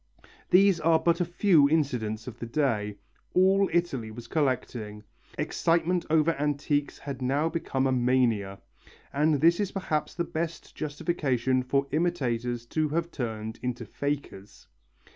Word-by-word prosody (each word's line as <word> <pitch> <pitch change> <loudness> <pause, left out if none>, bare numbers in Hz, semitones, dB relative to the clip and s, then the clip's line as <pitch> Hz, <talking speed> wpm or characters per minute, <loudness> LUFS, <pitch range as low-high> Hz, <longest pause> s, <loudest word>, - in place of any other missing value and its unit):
These 190 -1 +5
are 165 0 +4
but 170 +2 +1
a - - +2
few 170 -4 +4
incidents 120 -8 0
of 120 -2 -9
the 120 - -5
day. 115 -6 0 0.4
All 190 +1 +4
Italy 165 -10 0
was 115 +2 -9
collecting. 120 -7 -2 0.3
Excitement 170 +1 +1
over 160 +1 +4
antiques 145 0 -1
had 140 -2 -7
now 140 +5 +1
become 135 -5 -1
a 135 - +2
mania, 120 -6 +1 0.6
and 150 +2 +3
this 170 +3 +5
is 205 -2 -1
perhaps 160 -6 -2
the 170 - 0
best 170 0 -5
justification 135 -5 -1
for 135 +2 0
imitators 125 -8 -1
to 155 -1 +1
have 170 +3 -1
turned 110 -4 -5
into 125 -1 -3
fakers. 140 -6 -5
145 Hz, 140 wpm, -27 LUFS, 120-165 Hz, 0.6 s, These